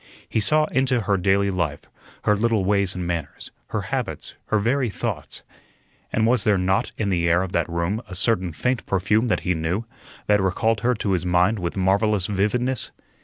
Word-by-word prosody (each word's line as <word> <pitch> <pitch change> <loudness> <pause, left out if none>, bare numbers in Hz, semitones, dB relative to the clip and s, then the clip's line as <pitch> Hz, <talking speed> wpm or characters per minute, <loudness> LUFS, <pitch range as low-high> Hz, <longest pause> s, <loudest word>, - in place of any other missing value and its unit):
He - - 0
saw 155 +8 +4
into 130 -2 +2
her 100 -1 +1
daily 100 +1 +2
life, 85 -6 -2 0.4
her 105 - +3
little 110 -2 +1
ways 100 -1 +1
and 90 -1 -3
manners, 85 -4 -4 0.2
her - - -2
habits, - - -4
her 110 - +2
very 120 +4 +1
thoughts. - - -4 0.7
And 110 - +1
was 120 -1 +3
there 105 -2 +3
not 95 +1 0
in 100 -3 -1
the 85 -2 +1
air 85 +2 +3
of 95 - -5
that 85 -2 0
room 85 +6 -1
a 95 - -7
certain 95 -2 +2
faint 125 +9 -2
perfume 105 +5 +1
that 110 - 0
he 90 - 0
knew, 85 +7 -2 0.4
that 105 -1 +3
recalled 105 +4 +1
her 125 +1 +2
to 105 -2 -2
his 90 -2 0
mind 90 +4 +2
with 90 +2 -3
marvellous 100 +1 +2
vividness? 115 +6 0
100 Hz, 190 wpm, -23 LUFS, 90-110 Hz, 0.7 s, saw